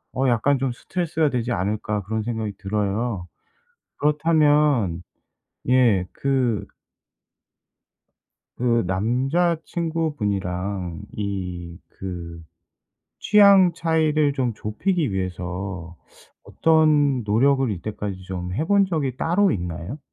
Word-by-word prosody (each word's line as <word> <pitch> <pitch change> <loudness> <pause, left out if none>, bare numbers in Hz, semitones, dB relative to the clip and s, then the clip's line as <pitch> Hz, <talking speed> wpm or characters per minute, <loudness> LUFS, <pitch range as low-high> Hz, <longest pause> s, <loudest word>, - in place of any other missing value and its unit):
'어 130 +1 +1
약간 135 +4 +2
좀 135 -2 0
스트레스가 160 +2 -1
되지 125 -1 -2
않을까?' 105 +1 -1
그런 110 +2 -3
생각이 110 -3 -3
들어요. 105 -1 -2 0.7
그렇다면 150 - +2 0.7
예. 115 -8 +4
그 130 -6 0 1.9
그 120 -2 +2
남자 130 - +1
친구분이랑 100 - -2 0.2
이 90 -4 -4 0.2
그 85 -3 -6 0.8
취향 200 -4 +6
차이를 155 -3 +1
좀 125 -4 0
좁히기 145 - -1
위해서 90 -1 -4 0.5
어떤 150 -5 +3
노력을 130 +4 +2
이때까지 100 0 -5
좀 90 -1 -5
해 155 +11 -2
본 200 -1 +4
적이 145 -9 -2
따로 190 +6 +2
있나요? 90 - -5
120 Hz, 205 characters per minute, -23 LUFS, 95-150 Hz, 1.9 s, 취향